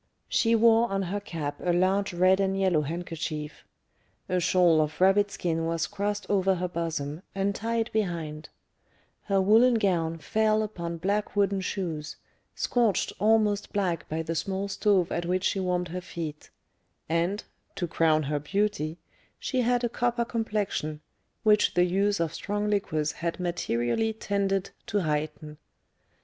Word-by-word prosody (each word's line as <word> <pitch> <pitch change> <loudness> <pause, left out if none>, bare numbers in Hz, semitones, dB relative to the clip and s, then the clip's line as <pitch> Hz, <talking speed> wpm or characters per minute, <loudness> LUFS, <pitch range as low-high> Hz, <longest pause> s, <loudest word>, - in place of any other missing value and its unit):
She 230 0 +3
wore 230 +1 +5
on 195 0 -1
her 195 +3 -2
cap 160 -7 -5
a 180 - +2
large 190 +3 +2
red 185 +2 +4
and 195 0 +1
yellow 185 -5 +3
handkerchief; 155 -1 -5 0.6
a 185 - +1
shawl 175 -2 +4
of 155 0 -3
rabbit 195 +2 +4
skin 165 -4 -2
was 165 0 0
crossed 205 0 -3
over 195 -1 +2
her 180 0 -2
bosom, 165 -3 -3
and 195 +1 0
tied 230 +2 -2
behind; 165 -7 -2 0.8
her 195 -1 +2
woollen 225 +6 +5
gown 170 -6 +1
fell 215 +5 +1
upon 170 -5 -5
black 200 +6 -1
wooden 200 -1 +2
shoes, 165 -5 -4 0.4
scorched 235 -5 +1
almost 210 -1 +2
black 180 -6 -1
by 160 +1 -2
the 165 +1 -3
small 190 +4 -2
stove 195 -2 +2
at 170 0 -2
which 185 +1 0
she 195 - +1
warmed 180 -1 -1
her 180 +2 -4
feet; 160 -4 -7 0.6
and, 170 +5 0 0.3
to 180 - -1
crown 160 -2 +2
her 145 +1 -1
beauty, 175 -1 -1 0.4
she 260 -2 -1
had 245 0 +1
a - - +3
copper 240 0 0
complexion, 210 -10 -2 0.4
which 210 -1 +4
the 180 - +5
use 200 +2 +1
of 165 -1 -1
strong 205 +4 -2
liquors 155 -7 0
had 170 +3 -4
materially 175 - 0
tended 200 -3 -1 0.2
to 205 - 0
heighten. 150 -1 -3
185 Hz, 150 wpm, -27 LUFS, 165-205 Hz, 0.8 s, wore